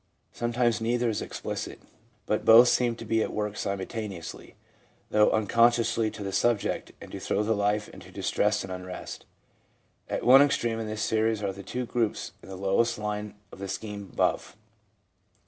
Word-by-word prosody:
Sometimes 120 -1 0
neither 120 +1 +1
is 110 - -2
explicit, - - -5 0.5
but 105 - 0
both 120 +2 +8
seem 120 -2 +2
to 115 - -9
be 115 +1 +1
at - - -1
work 105 -1 -3
simultaneously, 100 -2 -5 0.6
though 105 0 +5
unconsciously 115 +1 +3
to 105 - -8
the 100 - -3
subject, 105 +3 0
and - - -11
to - - -6
throw 105 - 0
the 110 +1 +1
life 105 0 0
into - - -13
distress 105 0 0
and 95 - -6
unrest. 90 0 -8 0.8
At - - -2
one 130 +3 +9
extreme 120 -5 +1
in 110 - -4
this 110 0 -3
series 110 -1 +1
are 100 -1 -1
the 100 +6 -5
groups 115 -3 -1
in - - -14
the 95 - -6
lowest 100 +5 +1
line 105 0 -4 0.2
of - - -12
the 100 - -5
scheme 100 +1 -6
above. - - -1
110 Hz, 165 wpm, -27 LUFS, 100-115 Hz, 0.8 s, one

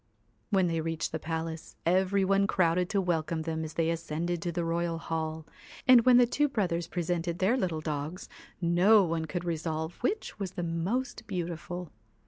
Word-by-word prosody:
When 195 -4 +3
they 165 -2 0
reached 165 0 -2
the 160 - -3
palace, 160 0 -4
every 190 +3 +3
one 195 +1 +3
crowded 175 0 +2
to 200 - +1
welcome 165 -3 -1
them 160 0 -2
as 155 -1 -7
they 165 0 +1
ascended 165 +1 -2
to 175 - -2
the 170 0 -2
royal 170 0 -1
hall, 160 -1 -3 0.4
and 250 -3 +8
when 250 -1 +8
the 245 - +7
two 295 +5 +1
brothers 175 -9 -1
presented 170 0 -2
their 195 +6 +3
little 175 -10 -1
dogs, 155 +3 -4 0.3
no 185 +5 +5
one 165 -2 -1
could 175 +2 -4
resolve 160 0 -3
which 400 - -2
was 190 -2 -4
the 175 - -3
most 220 +9 -2
beautiful. 175 -2 -4
170 Hz, 175 wpm, -29 LUFS, 165-190 Hz, 0.4 s, and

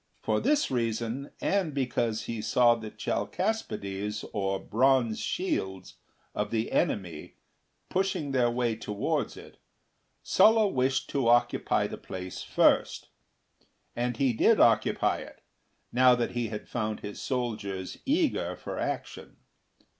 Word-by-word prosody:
For - - +1
this 295 - +1
reason, 120 +2 -2
and 185 -7 0
because 120 -4 -1
he 115 0 -4
saw 120 +2 +4
the 110 -2 -6
Chalcaspides, 105 - -3
or 95 -2 0
Bronze 125 -1 +2
shields, 95 - -3 0.4
of - - -2
the 115 -1 -1
enemy 85 -6 -1 0.5
pushing 185 -6 -1
their 125 -3 +3
way 120 -1 0
towards 105 -2 -2
it, - - -13 0.6
Sulla 220 -1 +5
wished 135 -5 0
to 135 -4 0
occupy 120 +1 +3
the - - -6
place 95 0 -7
first; - - +2 0.9
and 120 -1 -1
he 135 -2 +2
did - - +4
occupy - - +3
it, - - -11 0.5
now 125 +1 +6
that 120 -1 -1
he 120 -2 -2
found 110 0 -4
his 105 - -7
soldiers 105 -7 -3
eager 310 +3 0
for - - -6
action. - - -5
120 Hz, 125 wpm, -28 LUFS, 110-135 Hz, 0.9 s, now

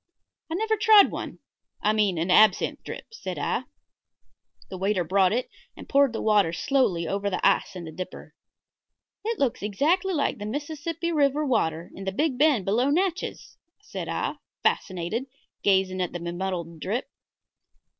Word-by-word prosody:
"I - - -1
never 440 +3 0
tried 425 -1 +7
one - - -6 0.4
I 210 - +2
mean 205 -5 +2
an 170 +3 0
absinthe 215 +3 +4
drip," - - -7
said - - -6
I. - - -1 1.1
The 190 - -5
waiter 195 -1 +1
brought 190 +2 +3
it 245 +4 0 0.3
and - - -10
poured 280 -2 +4
the 225 - -4
water 210 -6 +3
slowly 200 - +1
over 200 +2 -1
the 185 - -2
ice - - +1
in 175 -2 -6
the 160 - -7
dripper. 185 +3 -8 0.9
"It 450 +1 -2
looks 265 -4 0
exactly 325 - +1
like 285 -6 0
the 205 - -5
Mississippi 315 +6 -3
River 295 -1 +2
water 170 - 0
in 195 - -8
the 190 - -1
big 265 +4 -1
bend 285 - +4
below 235 +7 +2
Natchez," 360 +4 -2 0.2
said 420 - -7
I, - - -2 0.3
fascinated, 185 +7 -1 0.4
gazing 190 -1 +2
at 180 - -2
the 175 - -4
be 170 0 -4
muddled 175 -2 -4
drip. 215 - -2
215 Hz, 165 wpm, -26 LUFS, 185-295 Hz, 1.1 s, tried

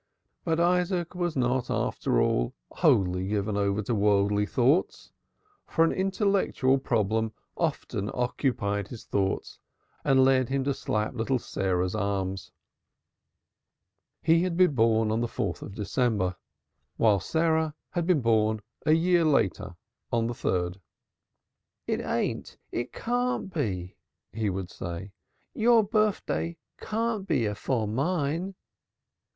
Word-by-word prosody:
But 165 -1 0
Isaac 180 0 +1
was 175 -2 -2
not 125 -1 0
after - - 0
all - - +1 0.2
wholly 90 0 +2
given 105 0 -1
over 100 +1 0
to 120 - -1
worldly 105 0 +2
thoughts, 135 - +1 0.6
for 165 - +3
an - - +1
intellectual 190 - +1
problem 110 -3 0 0.2
often 100 +1 -2
occupied 120 -5 -1
his 115 -1 -10
thoughts 95 -1 -2 0.4
and 130 -1 +5
led 130 -2 +3
him 135 0 0
to 140 +1 0
slap 110 -5 -2
little 125 +2 0
Sarah's 95 -5 -1
arms. 95 -3 -2 1.7
He 165 +1 +4
had 180 -2 -1
been 180 -4 +5
born 110 -2 +3
on 110 +1 0
the 120 - 0
4th - - -3
of 100 - -8
December 105 -4 0 0.6
while 105 -3 +4
Sarah 160 - +1 0.2
had 175 -2 -1
been 175 -6 +3
born 110 -2 +2 0.3
a 155 - +6
year 170 +1 +3
later 135 - +1 0.4
on 115 -1 +1
the 120 - -2
3d. 90 -4 -1 1.1
"It - - -1
ain't, - - -2
it 120 - -3
can't 245 -4 -1
be," 95 - -3 0.4
he 110 -1 -1
would 95 0 -4
say. 90 -1 -6 0.4
"Your 230 0 +4
birfday 205 -5 0 0.2
can't 220 -2 -2
be 115 - +1
afore 110 +2 -1
mine." 160 - -1
120 Hz, 125 wpm, -27 LUFS, 100-165 Hz, 1.7 s, a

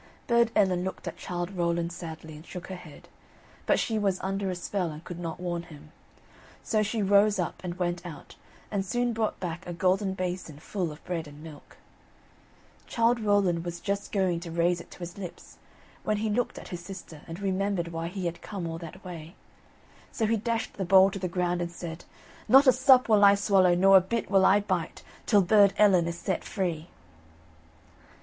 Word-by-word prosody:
Burd 235 -1 +3
Ellen 185 -4 +3
looked 190 - -5
at - - -4
Childe 175 +1 -4
Rowland 170 -1 0
sadly, 160 -2 -8
and 150 - -11
shook 180 +1 -9
her 190 - -5
head, 160 -5 -13 0.6
but - - +3
she 220 -2 0
was 195 -3 0
under 195 0 -2
a 185 - -2
spell, 180 0 -2
and 155 +1 -9
could 175 0 -8
not 165 -1 -5
warn 175 -1 -3
him. 155 -3 -14 0.7
So 215 -2 +1
she 215 +1 -1
rose 205 +1 +4
up, 175 -3 -3
and 175 -1 -5
went 175 -1 -2
out, 165 -5 -10 0.4
and 200 -2 0
soon 240 +5 -1
brought 220 -1 -1
back 175 0 -5
a 175 - -4
golden 190 +2 +1
basin 180 -5 -4
full 175 +2 -3
of 150 - -13
bread 165 -3 -3
and 145 +1 -12
milk. 155 -3 -13 1.1
Childe 235 0 +2
Rowland 200 -6 +2
was 175 0 -5
just 200 +2 -3
going 185 -4 +1
to 170 0 -8
raise 170 +1 +1
it - - -15
to - - -13
his 175 +2 -8
lips, 180 -3 -9 0.5
when 215 - 0
he 215 0 -1
looked 245 +3 -1
at - - -9
his 175 - -5
sister 175 -4 -10
and 165 +2 -7
remembered 195 -2 -1
why 165 0 -4
he 185 +1 -5
had 170 0 -3
come 195 -5 -6
all 165 0 -4
that 180 +3 -10
way. 170 0 -8 0.8
So 225 - -1
he 225 +1 +2
dashed 230 +1 -2
the 195 - -1
bowl 190 +1 +6
to 195 - -5
the 185 - -2
ground, 175 0 -1
and 170 0 -3
said: 170 -1 -8 0.4
"Not 270 +2 +7
a 260 - +8
sup 260 0 +5
will 210 -2 +5
I 200 0 +8
swallow, 195 -3 +4
nor 195 +2 +7
a - - +5
bit 225 +6 -3
will 195 -1 +5
I 205 +2 +5
bite, 185 -5 -3 0.2
till 205 -4 +5
Burd 200 +1 +5
Ellen 190 -5 +5
is 170 0 -4
set 190 +1 -2
free." 170 -5 -3
185 Hz, 200 wpm, -28 LUFS, 170-200 Hz, 1.1 s, a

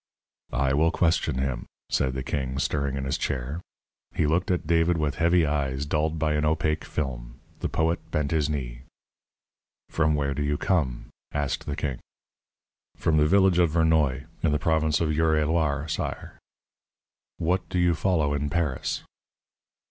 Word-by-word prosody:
"I 70 -1 +2
will 80 +4 +4
question 80 -5 +1
him," 65 -2 -2 0.2
said 65 -1 +1
the 65 - -3
king, 65 -1 -2
stirring 70 -1 -1
in 70 - -3
his 65 - -1
chair. 70 +4 -3 0.5
He - - +2
looked 85 +4 +1
at 90 -4 0
David 85 +1 +3
with 75 -3 0
heavy 85 0 +4
eyes 70 -2 -1
dulled 75 +2 0
by 75 -1 +1
an 75 0 0
opaque 75 0 0
film. - - -4 0.2
The - - -2
poet 80 +1 -1
bent 75 -2 -1
his 75 -2 +1
knee. 60 -5 -4 1.1
"From 80 -2 +2
where 70 -1 0
do 75 - -3
you 75 0 0
come?" 75 -11 0 0.2
asked 75 -2 -2
the 70 - -2
king. 70 -5 -3 1.0
"From 80 -1 +2
the 75 0 +4
village 95 0 +4
of 85 -2 +4
Vernoy, 80 -4 +2 0.2
in 80 - +2
the 75 - +2
province 80 0 +1
of 80 - +1
Eure 80 0 +3
et 75 - +1
Loir, 75 -2 0
sire." - - -4 1.0
"What 90 +3 0
do - - -2
you 90 -1 +4
follow 80 -4 +1
in 75 0 -1
Paris?" 75 -3 -1
75 Hz, 165 wpm, -26 LUFS, 70-80 Hz, 1.1 s, will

